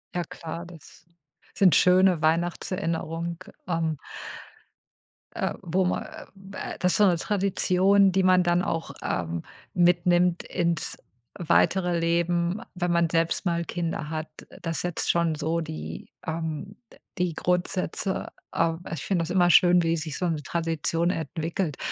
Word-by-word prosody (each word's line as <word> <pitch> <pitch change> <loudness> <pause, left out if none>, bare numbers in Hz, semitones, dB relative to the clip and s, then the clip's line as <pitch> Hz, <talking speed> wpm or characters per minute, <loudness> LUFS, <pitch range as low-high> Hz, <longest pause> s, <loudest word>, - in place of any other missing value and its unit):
Ja 175 - 0
klar, 165 +1 -7
das 165 -1 -15 0.5
sind 190 -4 +5
schöne 180 -2 +5
Weihnachtserinnerungen, 165 0 -1 0.3
ähm 165 -3 -1 1.4
äh, - - -1
wo 180 +2 0
man, 180 - 0 0.5
äh, - - -5
äh - - -12
das 180 -1 +2
ist - - +2
so 210 - +6
'ne 175 -2 +3
Tradition, 195 0 +3
die 190 0 +2
man 185 -1 +5
dann 175 +1 +2
auch, 165 -3 -2
ähm, 85 -1 -2 0.3
mitnimmt 175 0 +3
ins 170 -2 -1 0.4
weitere 175 +1 +2
Leben, 170 +3 +1
wenn 175 -1 -1
man 170 -1 +2
selbst 165 +3 0
mal 170 -1 0
Kinder 165 -2 -3
hat, 155 0 -3 0.3
das 165 -3 -2
setzt 175 -2 -2
schon 170 -1 +2
so 165 +2 -1
die, 160 0 -7 0.2
ähm, 160 +4 -4 0.2
d - - -17 0.2
die 180 -2 +1
Grundsätze 180 +3 -1 0.3
ähm, 165 0 +1
ich 165 - -4
finde 185 -4 +1
das 165 - -5
immer 180 -1 +4
schön, 175 +1 +6
wie 165 0 +1
sich 155 -2 -4
so 180 - 0
'ne 155 -3 -2
Tradition 165 0 0
entwickelt. 165 0 -3
170 Hz, 145 wpm, -26 LUFS, 165-180 Hz, 1.4 s, so